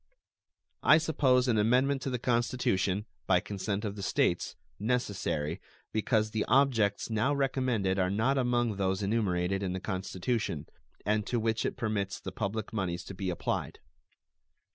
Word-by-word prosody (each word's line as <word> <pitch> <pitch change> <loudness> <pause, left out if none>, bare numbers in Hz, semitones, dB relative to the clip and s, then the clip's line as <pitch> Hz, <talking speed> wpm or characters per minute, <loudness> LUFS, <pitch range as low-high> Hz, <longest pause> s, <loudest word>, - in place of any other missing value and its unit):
I - - +7
suppose 135 -5 +2
an 115 -3 +3
amendment 130 +5 +3
to 135 - -2
the 125 - -1
Constitution, 115 -5 0 0.2
by 90 -1 +5
consent 100 +2 -3
of 100 -1 -3
the 100 - -6
States, 95 - +1 0.2
necessary, 95 -8 -1 0.3
because 110 0 +1
the 110 -1 0
objects 120 -7 +2
now 130 +6 +2
recommended 125 -8 0
are 90 0 +2
not 110 +8 +1
among 120 -4 +1
those 95 0 0
enumerated 95 -3 0
in 95 -2 -2
the 95 - -3
Constitution, 95 - -2 0.4
and 105 +1 +2
to 120 - 0
which 110 0 0
it - - -5
permits 105 -5 -2
the 95 - -6
public 105 +3 -3
moneys 90 -4 -2
to - - -8
be 95 0 -3
applied. 90 - -2
105 Hz, 150 wpm, -30 LUFS, 95-125 Hz, 0.4 s, I